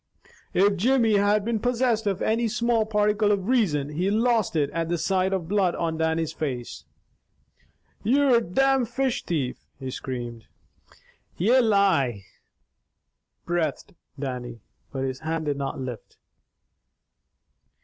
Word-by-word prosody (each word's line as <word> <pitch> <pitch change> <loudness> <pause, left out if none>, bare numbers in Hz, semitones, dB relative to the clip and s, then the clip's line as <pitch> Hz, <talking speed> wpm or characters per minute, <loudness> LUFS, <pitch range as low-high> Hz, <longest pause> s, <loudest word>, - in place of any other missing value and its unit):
If 200 +1 +4
Jimmy 230 0 +3
had 205 +1 +2
been 230 -1 0
possessed 240 -2 +1
of 195 -2 -1
any 230 +2 +1
small 230 -1 +1
particle 210 0 +2
of 195 -2 0
reason, 175 - +1
he 175 +6 -1
lost 225 -2 +1
it 145 -2 +1
at 165 0 -2
the 175 - 0
sight 185 +3 +1
of 185 -4 -2
blood 190 -2 +1
on 165 -1 -2
Dannie's 160 0 0
face. 130 -7 -5 1.2
"You're 260 +3 +4
a - - +2
domn 270 +7 +2
fish 260 +1 -1
thief!" 140 -7 -2 0.2
he 130 -1 -5
screamed. 120 -3 -6 0.9
"Ye 235 +9 +4
lie!" 190 - +2 1.2
breathed 170 -5 -2 0.3
Dannie, 125 -4 -5 0.3
but 135 -2 -3
his 130 0 -3
hand 160 0 -3
did 145 -1 -1
not 140 -1 -4
lift. 125 -4 -7
190 Hz, 130 wpm, -25 LUFS, 150-225 Hz, 1.2 s, If